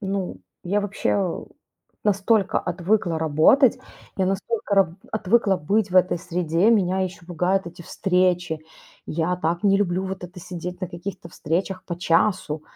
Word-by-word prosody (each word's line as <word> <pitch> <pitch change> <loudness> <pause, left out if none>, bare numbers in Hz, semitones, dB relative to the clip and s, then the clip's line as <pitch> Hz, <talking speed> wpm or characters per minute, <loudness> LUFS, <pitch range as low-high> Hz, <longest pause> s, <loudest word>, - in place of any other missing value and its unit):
ну, 195 - -3 0.3
я 200 +4 0
вообще, 200 -1 -2
э, 190 -4 -1 0.6
настолько 205 0 +2
отвыкла 175 -1 0
работать, 160 - +4 0.4
я 190 - +1
настолько 200 +2 -1
раб 195 -2 +5 0.2
отвыкла 210 -1 +2
быть 200 +5 0
в 185 - +1
этой 180 -1 +4
среде. 175 +2 +1
Меня 190 -4 +2
еще 180 -2 -4
пугают 180 +2 0
эти 170 0 -9
встречи. 180 -3 0 0.5
Я 170 +3 -1
так 170 +2 -1
не 195 -1 +5
люблю 190 -2 0
вот 190 -1 -5
это 180 +1 -11
сидеть 180 +1 -7
на 185 - -3
каких-то 170 0 -7
встречах 185 +5 -3
по 175 - -5
часу, 165 -3 +1
185 Hz, 150 wpm, -23 LUFS, 170-195 Hz, 0.6 s, раб